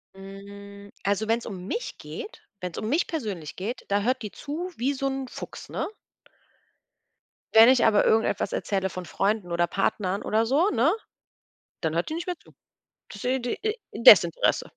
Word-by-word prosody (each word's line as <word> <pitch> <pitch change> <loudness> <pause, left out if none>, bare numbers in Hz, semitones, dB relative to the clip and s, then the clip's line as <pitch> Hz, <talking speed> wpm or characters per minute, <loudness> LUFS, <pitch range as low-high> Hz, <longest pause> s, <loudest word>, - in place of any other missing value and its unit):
Hm, 200 +1 -11
also, 205 +2 0
wenn 230 +1 +2
es - - -12
um 190 -4 -7
mich 475 - -4
geht 465 +1 -8 0.2
wenn 180 -1 -4
es - - -10
um 215 - -3
mich 310 +6 +2
persönlich 205 - -5
geht, 215 +7 -5
da 200 +1 +2
hört 255 +4 0
die 210 - -5
zu 320 +5 -5
wie 270 +4 0
so 275 0 -4
'n 270 -1 -3
Fuchs, - - -9
ne? - - -2 1.7
Wenn 225 +2 +9
ich 255 -2 +5
aber 210 -2 +4
irgendetwas 225 0 +1
erzähle 190 -1 -1
von 185 0 -7
Freunden 195 +2 -1
oder 175 0 +2
Partnern 195 0 -1
oder 220 +2 +1
so, 295 - +3
ne, 260 - +3 0.9
dann 160 -1 -1
hört 170 +1 0
die - - -2
nicht 340 +2 -4
mehr 360 - -2
zu. - - -20 0.6
Desi 250 +5 -1
d 240 0 -2
e 430 +1 0 0.2
Desinteresse. - - +6
220 Hz, 180 wpm, -26 LUFS, 195-270 Hz, 1.7 s, Wenn